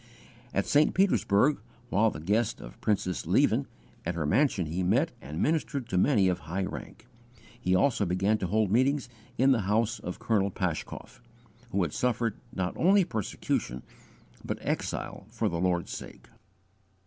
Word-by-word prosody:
At 100 - 0
St. 150 +1 +3
Petersburg, 150 - +3 0.3
while 110 +4 +4
the 75 - -7
guest 105 +8 0
of - - -11
Princess 95 -7 -1
Lieven, - - +3 0.4
at 85 +1 -2
her 80 -3 -1
mansion 100 - +2
he 85 +4 -2
met 90 - +2
and 75 +4 -6
ministered 145 -5 0
to - - -2
many 105 -4 +4
of 90 -1 +1
high 90 +4 -3
rank; 95 - -7 0.5
he 95 -6 +1
also 110 +3 +3
began 95 +5 +1
to 95 - -1
hold 105 +1 +1
meetings 130 +3 +2 0.3
in 130 +3 +5
the 125 - +3
house 110 +2 +1
of 90 - -6
Colonel 100 -3 +1
Paschkoff, 90 +4 -4 0.5
who 100 -3 +1
had 80 - -3
suffered 120 -3 0 0.2
not 90 -1 -2
only 195 +3 +5
persecution 100 - -3 0.6
but - - -3
exile - - -3
for - - -1
the 85 - -2
Lord's 90 -2 0
sake. - - -9
100 Hz, 160 wpm, -29 LUFS, 90-125 Hz, 0.6 s, in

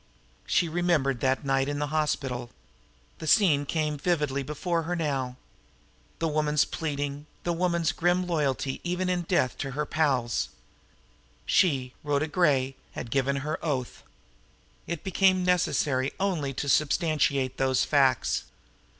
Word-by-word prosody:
She 175 - +2
remembered 160 -6 +1
that 135 +2 0
night 135 0 +1
in 145 - -2
the 145 +1 -3
hospital. 135 -6 -1 0.7
The 160 - -6
scene 155 -8 +4
came 150 -2 -1
vividly 150 -4 0
before 165 +5 -2
her 175 +2 -2
now. 135 -6 -2 0.8
The 165 - 0
woman's 150 -1 +2
pleading, 145 -1 -4 0.2
the 175 - 0
woman's 170 -2 +1
grim 175 +1 +1
loyalty 140 -5 -1
even 180 +1 -1
in 180 -1 +1
death 165 -7 0
to 135 - -3
her 150 - 0
pals. 135 -7 0 1.0
She, 135 -9 +2
Rhoda 145 +1 0
Gray, 140 -6 +2 0.2
had 115 - -6
given 140 0 +1
her 155 - -3
oath. 135 -6 -2 0.9
It 170 -3 -4
became 190 -1 +3
necessary 145 -7 +1
only 175 -8 0
to 145 - -3
substantiate 140 -3 +1
those 130 -1 +2
facts. 135 -4 +2
150 Hz, 135 wpm, -27 LUFS, 135-170 Hz, 1.0 s, scene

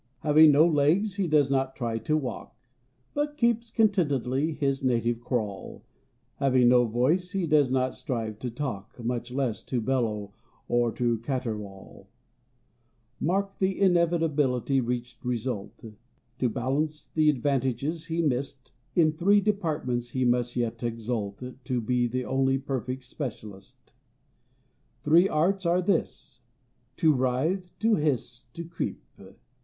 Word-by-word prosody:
= - - -43
Having 155 0 +6
no 150 +3 +6
legs 170 +6 +2
he 195 -3 0
does 150 -3 +3
not 135 -1 0
try 115 -3 -2
to 155 +5 0
walk, 135 -5 -5 0.6
`But 295 0 -1
keeps 235 -2 +1
contentedly 155 - +1
his 135 -3 -1
native 120 -2 +1
crawl; 110 -5 -4 0.5
Having 130 -3 +4
no 125 0 +5
voice 150 - 0
he 190 -3 0
does 150 -4 +3
not 130 0 0
strive 115 -7 -4
to 125 - -4
talk, 115 -5 -5
`Much 120 0 -3
less 125 -4 -2
to 125 - -1
bellow 110 -5 -1 0.3
or 120 -1 +2
to 120 -2 0
caterwaul.= 110 -6 -5 1.1
Mark 195 +4 -1
the 190 0 0
inevitably 160 -8 +2
reached 120 0 -4
result: 120 -3 -3 0.6
`To 125 -3 +1
balance 145 +6 -2
the 155 -1 +4
advantages 140 +3 -1
he 165 0 -1
missed, 135 -2 -2 0.2
In 160 -3 +4
three 195 +6 +3
departments 155 - -1
he 130 +1 -1
may 120 0 +3
yet 120 -2 -2
exult 115 -3 -3
`To 125 -2 -4
be 125 +1 +1
the 125 +1 -3
only 135 0 +1
perfect 130 -1 -4
specialist.= 110 -7 -9 1.1
Three 170 +6 +5
arts 185 +4 +1
are 180 +2 +2
his: 195 - -2 0.6
to 160 -3 +4
writhe, 145 +9 -1
to 225 -1 +3
hiss, 130 -5 -2
to 170 - -6
creep. 170 +1 -5
130 Hz, 135 wpm, -27 LUFS, 120-160 Hz, 1.1 s, Having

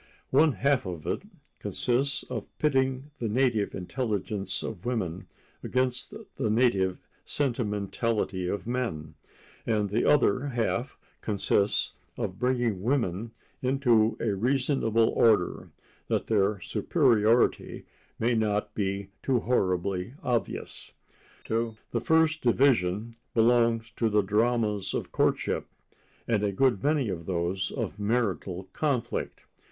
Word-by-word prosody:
One 150 +2 +5
half 140 -6 +1
of 85 -4 -6
it - - -1 0.4
consists 140 +4 0
of - - -5
pitting 135 -1 +1
the 115 - -1
native 115 -3 +1
intelligence 100 -2 -2
of 85 - -6
women 95 -8 -3 0.4
against 130 0 0 0.2
the 120 -5 0
native 105 -5 +2 0.3
sentimentality 105 -6 -1
of 95 0 -3
men, 115 -12 -3 0.5
and 105 -3 0
the 110 - +1
other 145 -2 +3
half 120 +1 -1 0.2
consists 100 -1 +1 0.2
of 95 - -4
bringing 120 -6 0
women 115 -3 0 0.3
into 125 -4 +3
a 110 -3 0
reasonable 115 0 +2
order, 105 -6 +2 0.4
that - - 0
their 100 -1 +2
superiority 115 +2 +2 0.3
may 120 +2 +1
not 105 -2 0
be 100 -1 -2
too 130 -4 +1
horribly 95 -1 0
obvious. 120 -2 -2 0.5
To 115 0 -1 0.2
the - - -1
first 160 -1 +3
division 115 -4 +2 0.2
belong 115 0 +4
the 105 -3 +2
dramas 105 0 +1
of - - -4
courtship, - - 0 0.6
and 115 -3 +2
a 100 - +1
good 120 0 +2
many 145 -4 +2
of 85 -3 -5
those 90 +1 -1
of - - -4
marital 100 -4 -1
conflict. 130 -6 -2
115 Hz, 115 wpm, -28 LUFS, 100-125 Hz, 0.6 s, One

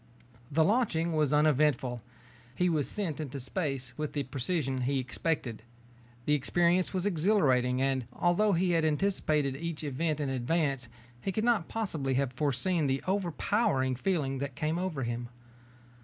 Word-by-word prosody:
The 160 +3 +4
launching 170 -5 +1
was 150 -3 +2
uneventful. 150 -5 +2 0.5
He 180 0 +2
was 155 -4 0
sent 180 -8 -3
into 140 -2 -4
space 135 -1 -3
with 150 -1 -3
the 145 - -1
precision 135 +1 -2
he 135 +2 0
expected. 130 -3 -2 0.6
The 150 - +2
experience 175 +5 +2
was 185 -1 -2
exhilarating 150 - +2
and, 135 -3 0
although 195 +4 +2
he 180 +1 +2
had 165 -1 +2
anticipated 155 -4 +1
each 165 +1 -4
event 150 +2 -1
in 145 - -1
advance, 135 0 0 0.3
he 195 - -2
could 215 +4 -1
not 225 -9 +2
possibly 155 -12 -2
have 135 -1 0
foreseen 150 +5 0
the 135 0 0
overpowering 175 - +1
feeling 135 -3 -1
that 140 -2 -4
came 155 +5 -1
over 175 -7 -2
him. 120 0 -3
150 Hz, 150 wpm, -30 LUFS, 135-175 Hz, 0.6 s, The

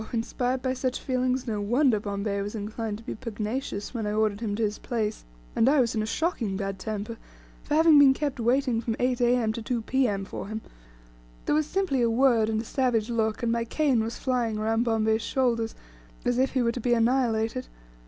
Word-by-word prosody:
Inspired 245 +2 -1
by 255 -1 0
such 255 0 -2
feelings, 255 -1 -1
no 215 -3 -2
wonder 240 +2 +3
Bombay 200 0 -2
was 205 +2 -4
inclined 215 0 -4
to 225 - -14
be - - -5
pugnacious 220 0 -4
when 225 -4 -2
I 210 - -1
ordered 215 -1 +1
him 215 -3 -2
to 225 - -1
his 210 0 -1
place, 220 -3 -3 0.3
and 235 - +4
I 290 +1 +4
was 235 -3 +2
in 220 - 0
a 215 - -2
shocking 225 - -1
bad 195 -1 -4
temper 215 +2 -4 0.4
for 295 - -2
having 320 -1 +7
been 270 -2 +7
kept 285 -3 -2
waiting 245 0 +1
from 225 -1 -2
8 250 0 0
A.M. 240 -2 +2
to 230 - -5
2 235 0 -2
P.M. 220 -7 0
for - - -6
him. 220 +1 -5 0.8
There - - +1
was 305 0 +2
simply 370 -8 0
a 235 - +3
word 230 -2 +3
and 220 -1 0
a 225 - -4
savage 240 -3 0
look, 220 0 0
and 230 - +1
my 235 0 0
cane 255 -1 +1
was 225 +1 -4
flying 240 -4 -1
around 225 +2 +1
Bombay's 220 -1 +1
shoulders, 235 -4 0 0.5
as 245 0 +1
if 265 0 +1
he 260 -2 +2
were 235 - +2
to 245 - -5
be 240 +1 +2
annihilated. 230 0 +1
230 Hz, 210 wpm, -27 LUFS, 220-255 Hz, 0.8 s, having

